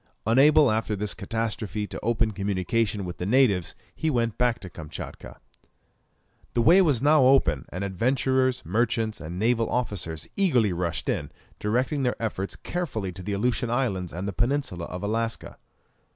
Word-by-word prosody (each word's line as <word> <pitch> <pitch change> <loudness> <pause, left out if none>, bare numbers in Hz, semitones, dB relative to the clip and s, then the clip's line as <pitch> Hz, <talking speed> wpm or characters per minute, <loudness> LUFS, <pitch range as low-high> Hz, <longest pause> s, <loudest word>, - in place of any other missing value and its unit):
Unable 135 +4 +5
after 110 -1 0
this 105 +1 -1
catastrophe 110 -1 -3
to - - -7
open 115 -1 +1
communication 100 +1 -1
with 90 - -6
the 90 - -4
natives, 105 -7 +3 0.2
he 160 - -1
went 115 -5 0
back 125 -2 +1
to 95 - -10
Kamtchatka. 80 -3 -9 1.1
The 120 - +2
way 175 +9 +7
was 145 -9 +2
now 150 -2 +5
open, 130 - +3
and 90 +3 -5
adventurers, 130 +5 +1
merchants, 110 +1 0
and 85 +2 -6
naval 115 +2 +1
officers 90 -10 -2
eagerly 125 - +2
rushed 85 -1 -2
in, - - -1 0.3
directing 125 +7 0
their 125 -2 0
efforts 100 -4 -3
carefully 120 - -3
to 90 +1 -9
the 100 +3 -3
Aleutian 120 +3 0
Islands 110 -8 -1
and 90 +4 -4
the 100 - -3
peninsula 120 -6 -1
of 90 +2 -7
Alaska. 115 +2 -2
110 Hz, 155 wpm, -26 LUFS, 95-125 Hz, 1.1 s, way